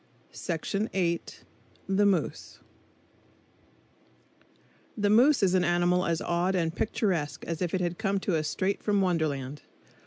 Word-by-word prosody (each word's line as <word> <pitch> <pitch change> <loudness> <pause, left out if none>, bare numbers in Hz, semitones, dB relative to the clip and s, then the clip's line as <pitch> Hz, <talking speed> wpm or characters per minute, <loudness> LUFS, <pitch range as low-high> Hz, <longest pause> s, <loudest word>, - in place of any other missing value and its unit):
The 190 +2 -3
Moose 195 - -1 2.4
The 205 -1 +1
moose 255 +4 +5
is 185 -2 +3
an 185 -1 +3
animal 175 +1 +2
as 165 -1 0
odd 175 +2 0
and 165 -2 -1
picturesque 180 -9 -1
as 165 0 -4
if 180 0 -1
it 185 - -1
had 175 -1 -2
come 200 -3 0
to 190 - 0
us 155 -1 -1
straight 190 +5 -1
from 205 -2 +1
Wonderland. 150 -6 -1
180 Hz, 125 wpm, -28 LUFS, 165-195 Hz, 2.4 s, moose